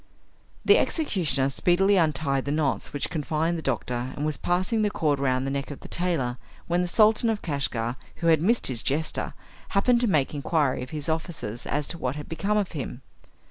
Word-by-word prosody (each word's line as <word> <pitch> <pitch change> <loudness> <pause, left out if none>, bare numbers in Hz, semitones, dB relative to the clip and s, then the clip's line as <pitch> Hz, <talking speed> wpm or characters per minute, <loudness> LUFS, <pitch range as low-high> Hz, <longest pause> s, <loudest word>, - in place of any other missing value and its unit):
The - - +7
executioner 175 - 0
speedily 185 +7 +3
untied 150 -5 +1
the 140 - -1
knots 150 -3 0
which 145 - -3
confined 160 +2 0
the 165 - -3
doctor, 125 -2 -2
and 145 - -1
was 155 -1 0
passing 185 +6 0
the 210 - +2
cord 150 -8 0
round 130 -1 +1
the 135 - -1
neck 140 0 -3
of 145 - -8
the - - -9
tailor, 155 -9 -1 0.3
when 175 +1 +1
the 180 - 0
Sultan 220 +4 +4
of 220 -2 -1
Kashgar, 130 -6 -2 0.2
who 170 - -6
had 160 -2 +5
missed 230 +7 +2
his 120 -4 0
jester, 155 +3 -2 0.4
happened 240 +4 +4
to 240 - +2
make 155 -9 +2
inquiry 145 -2 +1
of 125 - -6
his 150 0 -5
officers 160 - -3
as 145 0 -1
to 170 - -4
what 130 +1 -2
had 150 -1 -7
become 200 +6 0
of 205 -3 0
him. 135 -4 -5
155 Hz, 200 wpm, -26 LUFS, 135-180 Hz, 0.4 s, The